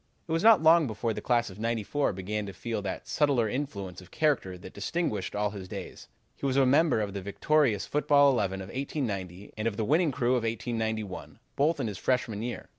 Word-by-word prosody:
"It - - -6
was 165 0 +1
not 220 -6 +6
long 160 -1 +6
before 110 +1 -2
the - - -5
class 120 -3 +1
of 95 - -12
'94 115 +5 0
began 100 +3 -3
to 100 - -7
feel 115 -1 -4
that 100 -1 -5
subtler 140 -7 +2
influence 100 -8 -4
of 90 - -15
character 140 -12 0
that 90 +1 -11
distinguished 105 - -2
all 105 0 0
his 95 -2 -8
days. 95 -1 -8 0.3
He - - -26
was 135 0 0
a 135 - +5
member 145 -2 +4
of 100 -2 -3
the 100 - -4
victorious 110 +3 +1
football 145 -1 +4
eleven 95 -6 -1
of 95 - -8
1890, 105 - -4
and 110 +1 -2
of 105 -3 -2
the 110 - 0
winning 155 +5 +3
crew 125 -2 0
of 125 -1 +2
1891, 110 -3 -3 0.2
both 150 +2 +2
in 135 - -1
his 105 -5 -4
freshman 120 -5 0
year. 120 +1 -5
115 Hz, 210 wpm, -28 LUFS, 100-140 Hz, 0.3 s, not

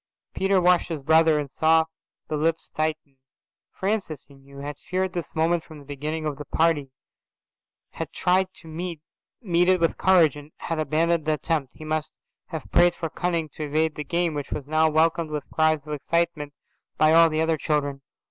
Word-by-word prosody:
Peter 195 0 +2
watched 180 -1 +3
his 155 -4 -4
brother 160 +1 +5
and 145 -3 -3
saw 160 0 +3 0.4
the 155 - -2
lips 160 +2 -1
tighten. 155 -3 -3 0.5
Francis, 190 -7 -2
he 140 - -18
knew, 140 0 -16
had 145 +1 -5
feared 185 0 -2
this 175 -1 -5
moment 165 +1 +1
from 155 - -12
the 145 - -13
beginning 150 +3 -4
of 150 -2 -2
the 150 - -6
party, 160 -4 +1 1.0
had - - -4
tried 185 +1 +2
to 165 - -9
meet 165 +1 -5 0.4
it 180 -1 +3
with 165 -1 0
courage 175 -6 +5
and 145 +1 -11
had 165 -1 -3
abandoned 160 +1 +1
the 155 - +2
attempt. 150 -2 -2
He 155 - -10
must 155 0 -2 0.3
have 160 -5 -7
prayed 175 0 +5
for 165 -2 -4
cunning 170 -2 -1
to 155 - -7
evade 155 +2 +1
the 150 - -5
game, 170 +2 0
which 145 -2 -4
was 145 - -4
now 155 +1 +3
welcomed 160 +1 +2
with 150 -2 -4
cries 155 -2 +2
of 150 - -5
excitement 155 0 -1 0.4
by 155 0 +5
all 165 0 +7
the 155 0 -1
other 160 0 +1
children. 145 -3 -1
160 Hz, 185 wpm, -25 LUFS, 150-170 Hz, 1.0 s, all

